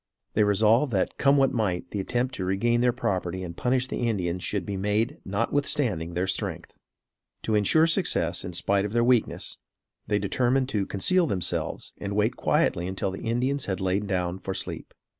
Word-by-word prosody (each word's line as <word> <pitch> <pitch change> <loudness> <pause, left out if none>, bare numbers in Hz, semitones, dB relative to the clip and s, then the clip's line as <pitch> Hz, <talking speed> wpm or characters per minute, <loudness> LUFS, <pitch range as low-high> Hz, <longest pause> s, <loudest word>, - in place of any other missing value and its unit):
They 105 - +3
resolved 110 +6 +3
that 95 - 0
come 140 +1 +4
what 135 -1 +3
might 95 -7 -1
the 105 - -3
attempt 125 +6 -1
to 95 - -4
regain 115 +6 +1
their 125 0 +4
property 95 -6 -2
and 85 -2 -6
punish 125 +4 0
the 120 -2 -1
Indians 90 -4 -2
should 100 -4 -2
be 100 - -3
made 105 +4 0
notwithstanding 100 - -1
their 90 +2 +1
strength. 95 - -3 0.7
To 110 - -1
insure 105 +10 +4
success 165 - +1
in 90 - -6
spite 100 +3 +1
of 105 +1 -4
their 120 0 +3
weakness, 120 -2 +1 0.5
they 105 -1 +2
determined 125 +6 +1
to 100 -6 -1
conceal 175 - +2
themselves 95 - -3
and 100 0 -4
wait 110 +4 +1
quietly 85 +1 +1
until 95 0 -2
the 95 - -7
Indians 125 +4 0
had 95 -2 -2
lain 95 +2 0
down 90 -1 -1
for 95 0 -4
sleep. 95 - -5
105 Hz, 180 wpm, -26 LUFS, 95-125 Hz, 0.7 s, come